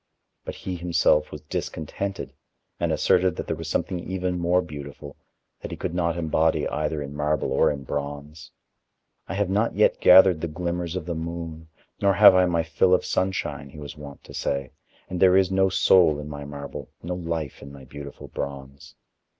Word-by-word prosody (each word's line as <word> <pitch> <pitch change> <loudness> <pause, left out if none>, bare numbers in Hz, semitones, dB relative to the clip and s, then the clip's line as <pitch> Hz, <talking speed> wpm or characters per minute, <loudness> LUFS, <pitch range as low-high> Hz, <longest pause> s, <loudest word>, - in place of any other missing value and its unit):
But - - -5
he 90 -2 -5
himself 85 -3 +2
was 75 - -8
discontented 80 +6 -5 0.5
and - - 0
asserted 90 -2 +2
that - - -5
there - - -2
was - - -7
something 90 - -1
even 90 0 -3
more 90 +1 +2
beautiful, 70 -2 -9 0.5
that - - -6
he - - -6
could - - -4
not 85 -1 0
embody 80 -1 +1
either 75 -1 -2
in 70 0 -8
marble 75 0 0
or - - +3
in 70 -2 -4
bronze. 75 +3 -6 0.8
"I 95 - -4
have 100 -2 0
not 105 +4 +1
yet - - +3
gathered 90 -3 +7
the 85 - -1
glimmers 85 +1 -3
of 90 -4 -4
the 85 - -3
moon, 80 -1 -6 0.3
nor 100 0 +4
have 105 -2 +9
I 90 0 +4
my 85 -2 +1
fill 80 +4 +3
of - - -2
sunshine," 95 -6 -2
he 70 - -13
was 75 -1 -8
wont 75 -2 -11
to - - -13
say, 70 -2 -2 0.4
"and 90 -1 -4
there 95 0 +6
is 95 -1 +3
no 95 0 +3
soul 90 -4 +4
in 75 - -7
my 70 -1 -7
marble, 70 -1 -8
no 90 +2 -3
life 85 -5 -4
in 70 - -10
my 70 -2 -12
beautiful 70 +1 -10
bronze." 70 0 -7
80 Hz, 190 wpm, -25 LUFS, 75-90 Hz, 0.8 s, have